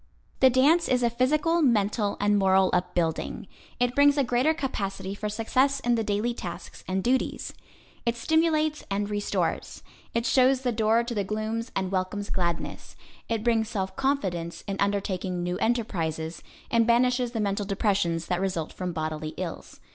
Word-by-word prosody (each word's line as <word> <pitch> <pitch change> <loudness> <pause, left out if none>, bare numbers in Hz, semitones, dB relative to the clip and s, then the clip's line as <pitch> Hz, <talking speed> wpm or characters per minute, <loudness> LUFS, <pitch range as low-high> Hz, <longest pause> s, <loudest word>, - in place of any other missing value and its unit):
The 260 - +7
dance 285 +7 +4
is 250 -1 +2
a 235 - +2
physical, 305 +8 +2
mental 210 -5 +2
and 205 0 +3
moral 190 -1 +4
upbuilding. 175 -2 -1 0.3
It 245 0 +2
brings 285 +1 +5
a 280 - +4
greater 250 +5 +2
capacity 195 -10 -3
for 210 +1 -4
success 255 +6 +1
in 240 -2 +1
the 225 -1 +1
daily 210 +3 0
tasks 175 -7 -8
and 190 0 -1
duties. 260 +2 0 0.5
It 235 0 0
stimulates 310 +1 +1
and 205 +1 -1
restores. 205 0 -2 0.3
It 230 0 +1
shows 260 +1 +4
the 250 -2 0
door 225 +1 +2
to 235 0 -4
the 205 -3 0
glooms 215 +3 -3
and 190 -1 -1
welcomes 195 +1 -2
gladness. 170 -2 -3 0.3
It 225 -2 -1
brings 225 -2 +2
self 190 -4 -3
confidence 190 -12 -1
in 195 -1 -3
undertaking 190 -3 -1
new 180 +1 -2
enterprises, 170 -9 -1 0.3
and 230 -1 +3
banishes 245 +1 +2
the 225 - -2
mental 200 -1 -1
depressions 195 -5 0
that 180 0 -1
result 180 -5 -2
from 180 -2 -4
bodily 155 -1 -4
ills. 180 -3 -6
215 Hz, 160 wpm, -27 LUFS, 190-245 Hz, 0.5 s, The